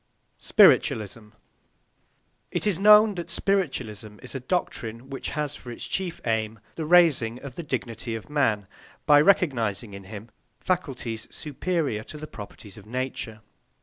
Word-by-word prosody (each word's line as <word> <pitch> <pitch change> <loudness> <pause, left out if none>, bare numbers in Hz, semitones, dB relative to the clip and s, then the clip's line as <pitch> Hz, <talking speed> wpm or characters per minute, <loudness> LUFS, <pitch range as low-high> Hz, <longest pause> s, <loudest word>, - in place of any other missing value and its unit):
SPIRITUALISM 105 0 +4 1.2
It - - -2
is 200 -4 +1
known 210 +1 +7
that 175 -2 -6
spiritualism 130 - -1
is 125 - -8
a 135 - -3
doctrine 125 -4 -3
which 135 - -4
has 150 -1 -1
for 125 - -9
its 120 - -7
chief 185 -3 -3
aim 110 -1 -1 0.2
the 160 -2 -4
raising 150 -9 +4
of 140 -3 -7
the 170 - -6
dignity 115 -5 -4
of 110 - -7
man, 115 -9 +1 0.4
by 145 -1 +7
recognising 120 - +2
in 100 -1 -9
him 105 +3 -9 0.3
faculties 130 -11 -2
superior 150 -6 -2
to 155 - -9
the 155 - -7
properties 105 -4 -11
of 105 - -16
matter. 125 -3 -4
130 Hz, 145 wpm, -26 LUFS, 110-160 Hz, 1.2 s, known